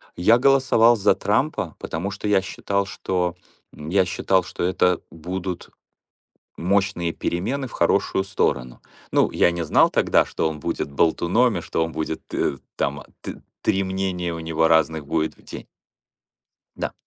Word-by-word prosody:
я 110 +7 +5
голосовал 130 -3 +5
за 105 - +3
Трампа, - - -1
потому 90 +5 -4
что 100 +2 -5
я 100 -2 +3
считал, 100 +1 -2
что, 90 -2 -2 0.4
м, 75 +1 -8
я 95 +1 +3
считал, 95 +1 +1
что - - -5
это 90 0 +2
будут 90 +2 -5 0.9
мощные 90 -2 0
перемены 130 +10 -2
в - - -15
хорошую 95 +2 +1
сторону. 65 -10 -1 0.3
Ну, - - +3
я - - +3
не 85 0 -3
знал 75 - +4
тогда, - - +3
что 80 - -1
он 80 -1 -5
будет 70 - -3
болтуном 90 - +2
и 85 - -3
что 80 - -1
он 80 - -4
будет 80 0 -4
т 70 - -1 0.2
там 70 +1 -2 0.2
т - - -8 0.2
три 95 0 +1
мнения 95 -2 -2
у 85 - -5
него 80 0 +1
разных 80 -2 +2
будет 80 +1 -1
в - - -22
день. - - -9 1.1
Да. - - -3
90 Hz, 160 wpm, -23 LUFS, 80-100 Hz, 1.1 s, я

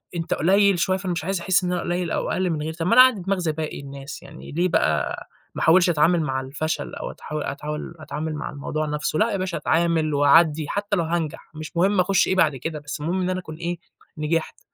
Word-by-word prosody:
أنت 165 -1 -1
قُليّل 195 +2 +3
شوية، 185 +2 +2
فأنا 190 -1 -3
مش 165 -2 -2
عايز 190 0 -1
أحِسّ 185 +1 +2
إن 180 - -1
أنا 180 - -1
قُليّل 175 -1 -2
أو - - -1
أقلّ 185 -1 0
من 155 -3 -2
غيري، 160 +1 -3
طب 165 +1 -3
ما - - +3
أنا 255 - +10
عندي 255 -7 +5
دماغ 195 +2 0
زى 170 -3 0
باقي 155 0 -4
الناس 140 0 -8
يعني، 145 - -13
يعني - - -9
ليه 180 - +3
بقى 75 - +1 0.4
ما - - -4
أحاولش 175 +2 +5
أتعامل 165 +2 +3
مع 130 -3 -1
الفشل 145 +3 -3
أو - - -5
أتحاول 150 -1 -5
أتحاول 150 +4 -5
أتعامل 155 0 -4
مع 150 - -4
الموضوع 155 +2 -3
نفسُه 150 0 -2
لأ، 225 +2 +3
يا 200 - 0
باشا 185 -2 -2
أتعامل 165 -2 +1
وأعدِّي 150 +2 +4
حتى 205 0 -1
لو 170 - +1
هانجح، 160 -2 -3
مش 155 +2 -7
مُهم 195 +3 +3
أخُشّ 190 +2 +3
إيه 190 - +1
بعد 155 -6 +3
كده، 150 +4 -4
بس 145 0 -7
المُهم 175 +5 -1
إن 180 - 0
أنا 185 0 -1
أكون 155 -4 -8
إيه 170 +2 -3 0.4
نجحت، 155 +2 -1
165 Hz, 240 wpm, -23 LUFS, 150-180 Hz, 0.4 s, أنا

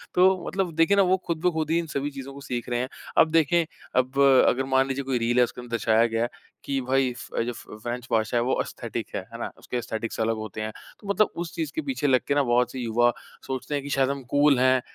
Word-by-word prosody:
तो 185 -1 +4
मतलब 190 -3 -1
देखिए 165 +5 +4
ना - - +7
वो 185 0 +3
खुद-ब-खुद 160 -2 0
ही 165 - +3
इन 170 - -4
सभी 140 -1 -2
चीजों 135 0 -8
को 140 - -10
सीख 125 -3 -4
रहे 120 0 0
हैं। 130 +1 -2 0.3
अब 160 - +5
देखें, 165 +1 +3 0.3
अब 130 +2 +1 0.3
अगर 130 +2 +2
मान 135 0 +4
लीजिए 135 +1 -2
कोई 130 -1 0
रील 120 +1 0
है, 125 - +7
उसके 120 +1 -4
अंदर 120 -1 -12
दर्शाया 115 0 +3
गया 115 0 -1
है 120 - -1 0.3
कि 135 -1 -1
भाई 130 0 +1
फ - - -5
जो 120 - -3
फ - - -10 0.2
फ्रेंच 120 0 -4
भाषा 110 +1 +1
है - - +3
वो 130 - 0
एस्थेटिक - - -5
है। - - -1
है - - -6
ना? - - -4
उसके 125 - -5
एस्थेटिक 115 -1 -4
अलग 115 0 +1
होते 110 -1 -6
हैं, 110 0 -3 0.3
तो 205 - -13
मतलब 205 +1 +3
उस 170 - -9
चीज़ 320 -2 -2
के 315 - 0
पीछे 270 - -1
लग 130 -2 +4
के 140 - +1
ना 145 - +3
बहुत 125 -1 +2
से 130 - -6
युवा 120 0 +2 0.4
सोचते 130 +2 -4
हैं 140 - -2
कि 145 - -6
शायद 135 -1 +2
हम 140 -1 -3
कूल 145 -2 +5
हैं, 130 0 +4
130 Hz, 260 wpm, -25 LUFS, 120-155 Hz, 0.4 s, ना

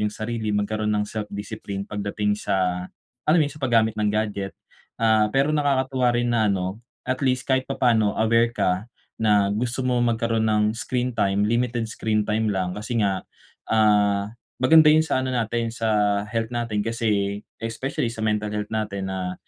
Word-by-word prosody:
yung 105 - +1
sarili 110 0 -4
magkaroon 105 +1 -1
ng 105 0 +1
self-discipline 105 -1 -5
pagdating 105 0 -2
sa, 90 -3 -1 0.4
alam 155 - +5
mo 160 - +4
yun 145 - -4
sa 150 - -14
paggamit 115 -4 +3
ng 105 - +2
gadget. 105 -2 -2 0.4
Ah, 110 -1 +3
pero 135 +6 +1
nakakatuwa 130 -3 +1
rin 120 0 0
na 110 -2 +2
ano, 95 +1 -2 0.2
at 130 0 -2
least 130 -2 +1
kahit 130 0 +2
papaano 115 -6 +2
aware 115 +1 +2
ka, 95 +2 0 0.3
na 105 -2 +3
gusto 120 +5 -2
mo 125 -1 +1
magkaroon 115 -1 +1
ng 105 -1 +2
screen 125 0 -1
time, 100 -1 +1
limited 120 +1 0
screen 110 -1 0
time 110 +1 0
lang 95 -1 -1
kasi 115 +2 -2
nga, 95 -2 0 0.5
ah, 105 -2 +3 0.3
maganda 160 +4 +7
yun 155 +1 +5
sa 160 - 0
ano 130 - -2
natin, 115 0 -1
sa 105 -3 +1
health 115 0 -1
natin 115 -3 -2
kasi, 105 -3 0 0.2
especially 125 +4 -3
sa 110 - -6
mental 105 -1 0
health 105 0 -3
natin 105 -3 -3
na 95 -1 -3
110 Hz, 170 wpm, -24 LUFS, 105-120 Hz, 0.5 s, maganda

